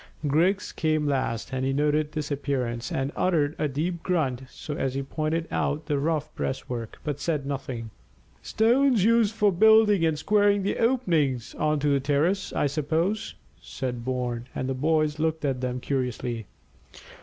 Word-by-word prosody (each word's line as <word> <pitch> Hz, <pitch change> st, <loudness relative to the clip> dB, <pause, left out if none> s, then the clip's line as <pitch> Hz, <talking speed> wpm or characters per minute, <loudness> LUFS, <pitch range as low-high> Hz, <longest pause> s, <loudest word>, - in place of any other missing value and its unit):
Griggs 170 Hz, +7 st, +2 dB
came 155 Hz, -2 st, 0 dB
last, 130 Hz, -4 st, -1 dB
and 130 Hz, 0 st, -1 dB
he 135 Hz, -, +1 dB
noted 150 Hz, +1 st, +1 dB
this 155 Hz, -1 st, -3 dB
appearance, 125 Hz, -4 st, -2 dB
and 135 Hz, +1 st, -1 dB
uttered 155 Hz, -5 st, +1 dB
a 155 Hz, -, +1 dB
deep 165 Hz, +5 st, -2 dB
grunt 145 Hz, -9 st, 0 dB, 0.3 s
as 135 Hz, -2 st, -2 dB
he 135 Hz, -, -1 dB
pointed 155 Hz, +4 st, -2 dB
out 150 Hz, +2 st, -1 dB
the 145 Hz, -2 st, 0 dB
rough 155 Hz, 0 st, -1 dB
breastwork, 125 Hz, -3 st, -4 dB
but 145 Hz, -2 st, -3 dB
said 150 Hz, -2 st, -1 dB
nothing. 130 Hz, -5 st, -5 dB, 0.5 s
"Stones 240 Hz, 0 st, +3 dB
used 225 Hz, -1 st, +3 dB
for 210 Hz, -2 st, +3 dB
building 215 Hz, 0 st, +5 dB
and 160 Hz, -2 st, +2 dB
squaring 205 Hz, +3 st, +3 dB
the 200 Hz, -, -1 dB
openings 165 Hz, -, +1 dB
on 155 Hz, 0 st, 0 dB
to 145 Hz, -, +1 dB
the 140 Hz, -1 st, +3 dB
terrace, 150 Hz, +8 st, 0 dB
I -, -, 0 dB
suppose," 160 Hz, -, -1 dB, 0.3 s
said 125 Hz, -3 st, -5 dB
Bourne, 125 Hz, -1 st, -3 dB
and 130 Hz, -, -2 dB
the 135 Hz, -, -1 dB
boys 155 Hz, +2 st, +1 dB
looked 160 Hz, -1 st, 0 dB
at 130 Hz, -3 st, -1 dB
them 125 Hz, 0 st, -2 dB
curiously. 125 Hz, -4 st, -3 dB
150 Hz, 160 wpm, -26 LUFS, 130-170 Hz, 0.5 s, building